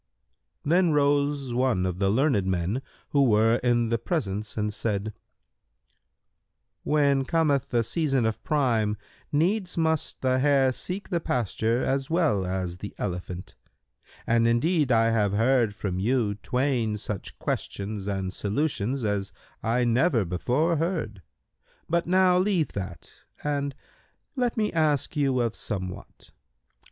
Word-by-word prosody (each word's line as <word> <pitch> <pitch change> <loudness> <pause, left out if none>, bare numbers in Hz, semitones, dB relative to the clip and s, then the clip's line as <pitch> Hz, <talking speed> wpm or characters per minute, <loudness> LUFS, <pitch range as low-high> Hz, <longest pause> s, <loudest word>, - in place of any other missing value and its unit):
Then 170 +2 +3
rose 145 -2 +1
one 120 -7 +1
of 90 -1 -3
the 100 -1 +2
learned 110 -4 +2
men 95 +7 -1 0.3
who 140 -1 +3
were 115 -1 +4
in 120 -2 +1
the 115 0 0
presence 105 - -3
and 105 0 -1
said, 105 0 -2 1.7
"When 140 -2 +2
cometh 145 -2 +1
the 120 -1 +2
season 135 0 0
of 110 0 -2
Prime, 115 -8 +1 0.3
needs 180 +5 +1
must 160 -2 0
the 130 0 +2
hare 135 -1 +4
seek 185 +9 -4
the 175 - 0
pasture 115 - 0
as 135 0 -1
well 160 - +1
as 90 -1 -3
the 105 - -7
elephant; 90 -1 -5 0.7
and 115 0 +3
indeed 145 +4 +2
I 115 -1 +4
have 105 -3 +1
heard 115 -1 +2
from 95 -3 -3
you 115 0 +1
twain 120 0 -1
such 105 -1 -5
questions 100 0 -4
and 95 -2 -2
solutions 125 +3 -1
as 100 -2 -1 0.3
I 120 +3 +1
never 120 - +2
before 130 - 0
heard; 150 - -2 0.7
but 170 +1 0
now 185 0 +4
leave 185 -5 +1
that 95 -4 -6 0.3
and 140 -1 -1 0.6
let 245 -3 0
me 215 -1 0
ask 155 -2 +1
you 135 -4 +2
of 115 -2 -1
somewhat. 95 -4 -6
120 Hz, 135 wpm, -26 LUFS, 105-145 Hz, 1.7 s, were